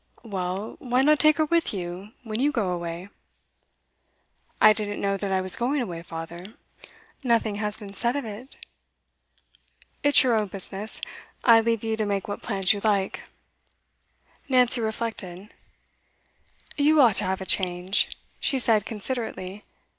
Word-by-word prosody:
'Well, 195 -1 -4
why 250 +1 +1
not 300 +1 +4
take 305 -1 +5
her 310 - +2
with 335 -7 0
you, 185 +3 -6
when 220 -1 -4
you 285 +3 +2
go 210 -9 -1
away?' 175 +1 -5 1.5
'I 215 - +7
didn't 205 -1 -4
know 200 0 0
that 195 0 -4
I 190 -1 +1
was 185 - +2
going 265 +5 -1
away, 175 -9 -4
father. 170 +4 -8 0.7
Nothing 230 -4 +1
has 210 0 -2
been 200 -2 -10
said 235 +5 0
of 285 -3 -3
it.' 220 +5 -9 1.5
'It's 290 -1 +7
your 250 -2 +2
own 215 -2 +1
business. 195 +2 -1 0.4
I 230 -2 +7
leave 230 -1 -1
you 225 0 -1
to 215 - -1
make 200 -1 -2
what 205 - -5
plans 195 -2 +1
you 205 - -4
like.' 200 -3 0 1.2
Nancy 250 -2 +3
reflected. 215 -4 -4 1.2
'You 300 +1 +4
ought 235 -7 +5
to - - +3
have 190 0 -1
a 190 - -6
change,' 185 0 +2 0.2
she 275 - +1
said 225 -5 +3
considerately. 210 -3 -5
210 Hz, 150 wpm, -25 LUFS, 190-240 Hz, 1.5 s, I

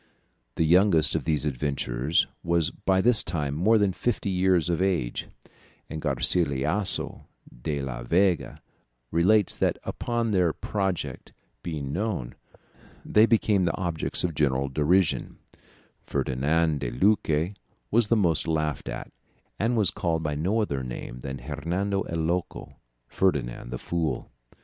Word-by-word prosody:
The - - +1
youngest 85 -1 +5
of - - -1
these 75 -2 0
adventurers 70 0 0 0.2
was 85 -1 +1
by 95 0 +1
this 120 +1 +5
time 75 -5 -2
more 100 +9 +3
than 100 -3 +2
fifty 105 -1 -1
years 90 -2 +2
of 85 0 0
age, 90 -11 -1 0.6
and 80 -1 -5
Garcilasso 75 +5 0 0.3
de 70 0 -2
la 60 -3 -5
Vega 90 +7 +1 0.5
relates 95 +5 +3
that - - +1
upon 120 -2 -2
their 90 -5 +2
project 95 -4 -3 0.3
being 75 -5 -4
known, 95 - -2 0.7
they 110 +2 +5
became 105 -5 +2
the - - -1
objects 85 -5 -1
of 90 -2 -1
general 70 -2 +1
derision; 75 +5 +1 0.6
Ferdinand 75 +4 0
de - - -3
Luque 80 - +1 0.4
was 115 0 +3
the 115 - +3
most 85 -6 +2
laughed 75 -2 -1
at, - - -6 0.5
and 115 +3 +1
was 105 -5 +3
called 80 -3 -1
by 75 -1 -1
no 95 +10 0
other 70 -9 -2
name 60 0 -7
than 65 +1 -5
Hernando 90 +8 -2
el 85 - -2
Loco, 85 +2 -3 0.3
Ferdinand 65 -11 -1
the 60 - -4
Fool. 85 +3 -3
85 Hz, 135 wpm, -26 LUFS, 75-95 Hz, 0.7 s, youngest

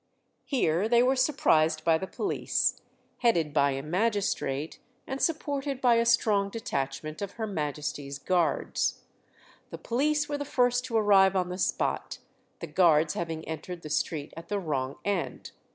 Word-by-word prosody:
Here 205 - +1
they 240 0 +5
were 260 +2 +3
surprised 160 - +2
by 160 -1 +3
the 190 - -4
police, 400 - -1 0.4
headed 170 -11 +2
by 140 -2 +3
a 135 0 -3
magistrate, 175 -5 -1 0.3
and 265 +1 -5
supported 285 -4 -1
by 245 -3 +4
a 230 0 +2
strong 210 -4 +3
detachment 155 - -4
of 200 -1 -4
Her 225 - -3
Majesty's 150 -6 -4
Guards. 175 +2 0 0.7
The - - -7
police 295 +5 0
were 290 0 -3
the - - -2
first 245 -2 +1
to 230 -3 -1
arrive 195 -3 +5
on 180 -1 0
the 180 +1 -5
spot, - - -1 0.4
the - - -3
Guards 160 -4 +3
having 165 -2 -4
entered 165 +2 -6
the 155 - -7
street 150 -1 -2
at 165 +1 -9
the 205 - -1
wrong 140 -7 -2
end. 200 -4 -2
190 Hz, 155 wpm, -28 LUFS, 155-235 Hz, 0.7 s, they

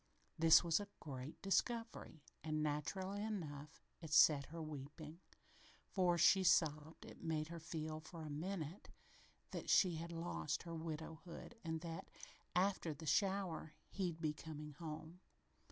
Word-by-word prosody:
This 165 +1 +8
was 170 +1 +3
a 205 - -5
great 135 -1 -7
discovery, 210 - 0 0.2
and, 155 -1 0
naturally 185 +7 -2
enough, 155 -9 -5 0.2
it 160 -3 -7
set 150 -3 +7
her 165 +2 -7
weeping, 155 +1 -7 0.7
for, 180 -3 +2
she 190 +3 +6
sobbed, 160 -3 +3
it - - -11
made 155 -1 -1
her 170 0 -6
feel, 155 -1 -4
for 160 +1 -9
a 155 - -5
minute, 170 +2 -4 0.6
that - - -5
she 180 -4 +5
had 170 +1 -5
lost 165 -3 -2
her 170 -1 -6
widowhood 160 +3 -6
and 160 -1 -2
that, 165 -1 -6 0.5
after 180 -4 +2
the 160 - -9
shower, 185 -2 +1 0.2
he'd 175 -4 -2
be 155 -2 0
coming 150 -1 -7
home. 160 +2 -7
160 Hz, 140 wpm, -40 LUFS, 155-175 Hz, 0.7 s, This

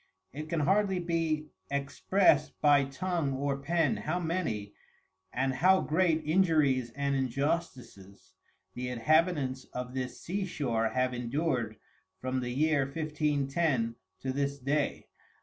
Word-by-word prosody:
It 155 +3 -6
can 165 -2 0
hardly 195 +5 +2
be 165 -3 -1 0.2
exprest 140 +3 +2
by 145 -2 +5
Tongue 150 +1 -2
or 140 +1 -1
Pen 160 +1 +1
how 175 +4 -2
many, 160 - -2 0.6
and 135 +1 0
how 185 +8 +4
great 160 0 +2
Injuries 155 -7 +3
and 140 0 0
Injustices, 130 - -3 0.4
the 125 0 -4
Inhabitants 135 +1 +1
of 125 0 -5
this 130 -1 -4
Sea 195 +3 -3
shore 120 -10 0
have 130 +1 0
endur'd 125 -2 -1 0.4
from 130 0 -2
the 125 -1 -3
year 145 +2 +2
1510, 145 -3 0 0.3
to 130 -1 -2
this 140 0 -1
day. 140 +2 -1
140 Hz, 125 wpm, -30 LUFS, 130-165 Hz, 0.6 s, by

